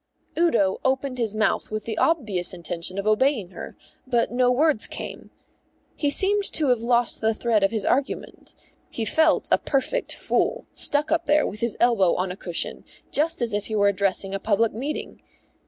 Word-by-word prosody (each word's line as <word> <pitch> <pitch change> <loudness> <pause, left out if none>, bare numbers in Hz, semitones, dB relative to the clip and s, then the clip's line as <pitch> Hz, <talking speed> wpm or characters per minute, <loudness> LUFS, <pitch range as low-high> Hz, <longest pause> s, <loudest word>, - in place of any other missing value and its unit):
Udo 235 - +2
opened 265 -1 -1
his 220 -3 -1
mouth 215 0 0
with 215 -1 -4
the 225 - -3
obvious 210 - +1
intention 170 +2 -3
of 200 - -3
obeying 215 -3 +1
her, - - -9 0.3
but 240 -2 +1
no 250 0 +2
words 285 -2 +3
came. - - -8 0.7
He 290 - 0
seemed 400 +7 +2
to 300 -4 +1
have 245 -2 +3
lost 235 0 0
the 220 0 +1
thread 220 -3 +1
of 195 - +4
his 220 -2 -2
argument. 270 +1 -2 0.3
He 225 - -3
felt 315 +8 +2
a - - +5
perfect 395 - -1
fool, - - -1
stuck 295 +2 +2
up 330 +1 0
there 300 +1 +4
with 210 - -5
his 235 -1 -1
elbow 225 -7 +3
on 185 0 -2
a - - -6
cushion, 175 -3 -3 0.3
just 300 -3 0
as 230 - -1
if 205 0 -2
he 220 - -3
were 200 -1 +4
addressing 195 0 -1
a 195 - -2
public 220 +2 +1
meeting. 275 +8 -5
230 Hz, 185 wpm, -24 LUFS, 200-280 Hz, 0.7 s, a